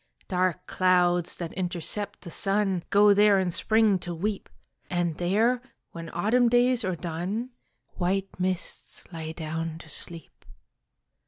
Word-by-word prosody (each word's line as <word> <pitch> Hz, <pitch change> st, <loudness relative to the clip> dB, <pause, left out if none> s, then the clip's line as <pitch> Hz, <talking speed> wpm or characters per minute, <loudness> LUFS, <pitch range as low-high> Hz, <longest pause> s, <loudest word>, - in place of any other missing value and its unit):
Dark 185 Hz, 0 st, 0 dB
clouds 180 Hz, -2 st, +2 dB
that 170 Hz, -2 st, -6 dB
intercept 185 Hz, +3 st, -3 dB
the 170 Hz, -, -8 dB
sun 195 Hz, -1 st, +1 dB
Go 205 Hz, 0 st, +6 dB
there 205 Hz, -1 st, +5 dB
in 185 Hz, -2 st, 0 dB
Spring 215 Hz, +1 st, +3 dB
to 175 Hz, 0 st, -5 dB
weep, 200 Hz, +4 st, -3 dB, 0.4 s
And 175 Hz, -2 st, 0 dB
there, 220 Hz, +8 st, +2 dB, 0.3 s
when 165 Hz, -1 st, -7 dB
Autumn 235 Hz, +6 st, +3 dB
days 245 Hz, 0 st, +3 dB
are 185 Hz, -2 st, -1 dB
done, 180 Hz, +9 st, -4 dB, 0.5 s
White 190 Hz, +1 st, -1 dB
mists 185 Hz, 0 st, -3 dB
lie 160 Hz, -1 st, -5 dB
down 160 Hz, 0 st, -4 dB
to 160 Hz, -, -13 dB
sleep. 165 Hz, +1 st, -4 dB
185 Hz, 135 wpm, -27 LUFS, 170-205 Hz, 0.5 s, Go